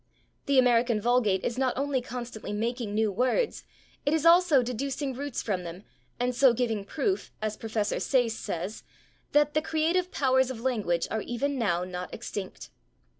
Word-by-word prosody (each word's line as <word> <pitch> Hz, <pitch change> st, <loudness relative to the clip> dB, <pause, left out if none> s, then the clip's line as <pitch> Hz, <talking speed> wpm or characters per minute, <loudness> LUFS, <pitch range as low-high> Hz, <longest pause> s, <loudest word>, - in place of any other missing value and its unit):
The 280 Hz, -1 st, +3 dB
American 240 Hz, -2 st, +4 dB
vulgate 220 Hz, -4 st, +2 dB
is 245 Hz, +2 st, -2 dB
not 260 Hz, -2 st, +1 dB
only 275 Hz, -1 st, 0 dB
constantly 240 Hz, -3 st, -6 dB
making 225 Hz, 0 st, -2 dB
new 215 Hz, -1 st, +2 dB
words, 255 Hz, -, 0 dB, 0.4 s
it 290 Hz, +2 st, +2 dB
is 320 Hz, 0 st, -1 dB
also 335 Hz, -5 st, +6 dB
deducing 270 Hz, +3 st, -3 dB
roots 280 Hz, +1 st, -4 dB
from 190 Hz, -5 st, -2 dB
them, 175 Hz, +3 st, -8 dB, 0.4 s
and 250 Hz, +1 st, 0 dB
so 255 Hz, 0 st, +5 dB
giving 225 Hz, -4 st, -1 dB
proof, 350 Hz, -, -2 dB
as 215 Hz, 0 st, -2 dB
Prof. 220 Hz, -1 st, -2 dB, 0.2 s
Sayce 245 Hz, -4 st, +2 dB
says, 195 Hz, +1 st, -5 dB, 0.5 s
that 295 Hz, 0 st, +4 dB
"the 310 Hz, -, +2 dB
creative 335 Hz, +4 st, 0 dB
powers 260 Hz, -1 st, +2 dB
of 255 Hz, -3 st, -5 dB
language 215 Hz, -9 st, 0 dB
are 220 Hz, -, -1 dB
even 275 Hz, +6 st, -2 dB
now 180 Hz, -6 st, +1 dB
not 180 Hz, 0 st, -6 dB
extinct." 195 Hz, -3 st, -7 dB
245 Hz, 165 wpm, -28 LUFS, 215-275 Hz, 0.5 s, also